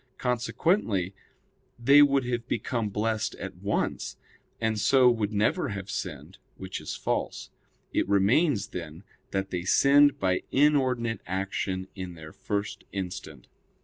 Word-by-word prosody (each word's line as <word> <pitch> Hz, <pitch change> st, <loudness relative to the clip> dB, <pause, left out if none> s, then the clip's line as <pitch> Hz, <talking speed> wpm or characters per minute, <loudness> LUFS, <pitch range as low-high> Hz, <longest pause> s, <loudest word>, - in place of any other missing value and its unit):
Consequently 125 Hz, -, 0 dB, 0.6 s
they 140 Hz, +5 st, +6 dB
would 140 Hz, -2 st, +4 dB
have 120 Hz, -1 st, -2 dB
become 115 Hz, -6 st, -1 dB
blessed 110 Hz, +1 st, -1 dB
at 95 Hz, -2 st, -7 dB
once; 100 Hz, +3 st, -2 dB, 0.4 s
and 110 Hz, -1 st, 0 dB
so 125 Hz, +4 st, +5 dB
would 110 Hz, -3 st, -1 dB
never 105 Hz, +1 st, +1 dB
have 100 Hz, -1 st, -5 dB
sinned, 80 Hz, 0 st, -6 dB, 0.2 s
which 95 Hz, -1 st, -6 dB
is -, -, -5 dB
false. -, -, -3 dB, 0.4 s
It -, -, 0 dB
remains, 100 Hz, -, +3 dB
then, 85 Hz, 0 st, -7 dB, 0.3 s
that 95 Hz, 0 st, -2 dB
they 90 Hz, -, -2 dB
sinned 140 Hz, +9 st, +5 dB
by 95 Hz, -1 st, +1 dB
inordinate 130 Hz, -6 st, +2 dB
action 95 Hz, 0 st, -2 dB
in 90 Hz, -3 st, -7 dB
their 80 Hz, -1 st, -11 dB
first 105 Hz, 0 st, -3 dB
instant. 90 Hz, -8 st, -6 dB
105 Hz, 130 wpm, -27 LUFS, 95-125 Hz, 0.6 s, they